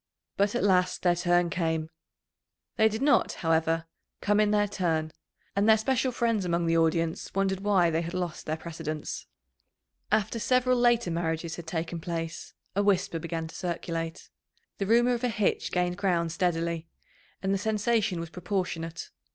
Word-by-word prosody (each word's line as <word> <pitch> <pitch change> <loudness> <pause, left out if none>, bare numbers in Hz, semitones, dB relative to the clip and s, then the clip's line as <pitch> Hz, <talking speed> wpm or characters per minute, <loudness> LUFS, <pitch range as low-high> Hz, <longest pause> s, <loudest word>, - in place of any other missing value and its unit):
But 200 +3 +1
at - - 0
last 185 -2 +2
their 175 -1 +4
turn 175 0 +2
came. 160 -2 -1 0.8
They 220 -1 +5
did 220 +4 -3
not, 290 - +3
however, 165 0 +2 0.3
come 205 +1 +2
in 210 -1 +4
their 205 0 +3
turn, 165 -5 -1 0.4
and 200 +2 +3
their 220 - +7
special 255 +3 +1
friends 230 -4 +1
among 170 -1 0
the 165 0 +2
audience 165 0 +1
wondered 195 -1 +1
why 195 -4 +3
they 165 +1 +1
had 170 +1 -5
lost 180 -3 -4
their 155 +1 -1
precedence. 160 -2 -5 0.8
After 215 +2 +1
several 255 +1 +2
later 240 -6 +3
marriages 165 0 -2
had 170 -1 -8
taken 165 +1 -3
place, 165 0 -5 0.2
a 200 - +3
whisper 195 -4 +1
began 165 0 -3
to - - -12
circulate. 165 -2 -4 0.5
The 195 - -1
rumour 240 +3 +4
of 240 0 -3
a 250 - +2
hitch 210 -3 0
gained 180 0 0
ground 175 -4 +1
steadily, 170 -2 -1 0.6
and 190 +1 +1
the 195 - 0
sensation 215 -2 +1
was 165 -1 -6
proportionate. 180 -3 -3
180 Hz, 165 wpm, -28 LUFS, 165-205 Hz, 0.8 s, their